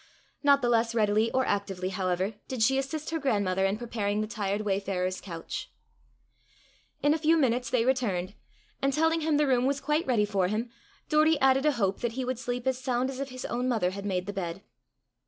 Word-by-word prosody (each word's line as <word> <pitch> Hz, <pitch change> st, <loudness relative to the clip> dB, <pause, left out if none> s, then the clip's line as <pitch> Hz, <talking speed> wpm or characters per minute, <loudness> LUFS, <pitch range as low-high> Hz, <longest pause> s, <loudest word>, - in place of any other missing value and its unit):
Not 280 Hz, -2 st, +4 dB
the 240 Hz, -, +2 dB
less 230 Hz, 0 st, +2 dB
readily 215 Hz, 0 st, +3 dB
or 260 Hz, 0 st, +1 dB
actively, 195 Hz, -2 st, -2 dB
however, 185 Hz, +1 st, -1 dB
did 255 Hz, -4 st, -1 dB
she 265 Hz, +4 st, +3 dB
assist 305 Hz, +4 st, -4 dB
her 325 Hz, -, -1 dB
grandmother 200 Hz, -8 st, +1 dB
in 195 Hz, +2 st, -1 dB
preparing 215 Hz, -3 st, -2 dB
the 215 Hz, -, 0 dB
tired 210 Hz, -2 st, -2 dB
wayfarer's 190 Hz, -2 st, -1 dB
couch. 170 Hz, -4 st, -6 dB, 1.3 s
In 290 Hz, +1 st, +5 dB
a 320 Hz, -, -1 dB
few 320 Hz, +2 st, +4 dB
minutes 245 Hz, -4 st, +1 dB
they 235 Hz, -2 st, +2 dB
returned, 205 Hz, -8 st, 0 dB, 0.5 s
and 275 Hz, 0 st, +1 dB
telling 320 Hz, +2 st, +2 dB
him 310 Hz, -1 st, +2 dB
the 300 Hz, -, +3 dB
room 255 Hz, -2 st, +2 dB
was 280 Hz, 0 st, 0 dB
quite 300 Hz, +2 st, 0 dB
ready 230 Hz, -5 st, +3 dB
for 195 Hz, -3 st, +1 dB
him, 220 Hz, +4 st, -2 dB, 0.4 s
Doory 310 Hz, 0 st, +4 dB
added 270 Hz, +2 st, +4 dB
a 300 Hz, -, +4 dB
hope 200 Hz, -6 st, 0 dB
that 240 Hz, -1 st, -2 dB
he 255 Hz, +1 st, -3 dB
would 255 Hz, -1 st, -2 dB
sleep 245 Hz, -1 st, -3 dB
as 260 Hz, -1 st, 0 dB
sound 255 Hz, 0 st, 0 dB
as 265 Hz, -, -8 dB
if 275 Hz, 0 st, -3 dB
his 255 Hz, 0 st, -7 dB
own 245 Hz, +2 st, -1 dB
mother 205 Hz, -7 st, +1 dB
had 200 Hz, +1 st, -5 dB
made 180 Hz, -2 st, -1 dB
the 205 Hz, -, -5 dB
bed. 180 Hz, -1 st, -4 dB
235 Hz, 210 wpm, -28 LUFS, 200-270 Hz, 1.3 s, In